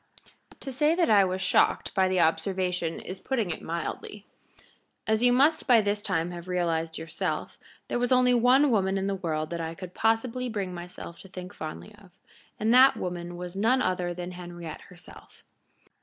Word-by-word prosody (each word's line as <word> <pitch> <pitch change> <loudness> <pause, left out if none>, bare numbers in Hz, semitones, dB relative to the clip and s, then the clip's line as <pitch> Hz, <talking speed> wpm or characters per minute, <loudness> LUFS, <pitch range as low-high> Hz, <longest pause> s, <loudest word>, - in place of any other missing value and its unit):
To 270 - -5
say 295 +5 +2
that 340 -8 +2
I 205 -2 +7
was 185 0 -2
shocked - - +2
by 190 -1 +3
the 185 -1 +2
observation 180 0 0
is 185 +1 -7
putting 230 -9 -1
it - - -5
mildly. 170 +5 -5 0.8
As 220 0 +1
you 245 0 +5
must 285 +6 +3
by 245 -3 +7
this 205 0 0
time 175 -4 -1
have 175 0 -8
realized 165 -3 -1
yourself, 160 -1 -4 0.3
there - - -1
was 245 +1 0
only 250 -1 +5
one 250 +4 +4
woman 195 -3 +1
in 195 - -1
the 200 - 0
world 160 -5 -3
that 170 -1 -3
I 165 0 -4
could 185 -1 -9
possibly 230 +3 0
bring 200 -5 -3
myself 175 -1 -9
to - - -12
think 180 -1 -9
fondly 160 +7 -8
of, 205 -2 -18 0.5
and 220 +2 +2
that 260 +2 +7
woman 175 -1 -5
was 180 +1 -7
none 230 +6 +3
other 180 -4 0
than 175 +1 -6
Henriette 175 -3 -8
herself. 175 -1 -15
185 Hz, 185 wpm, -27 LUFS, 175-225 Hz, 0.8 s, I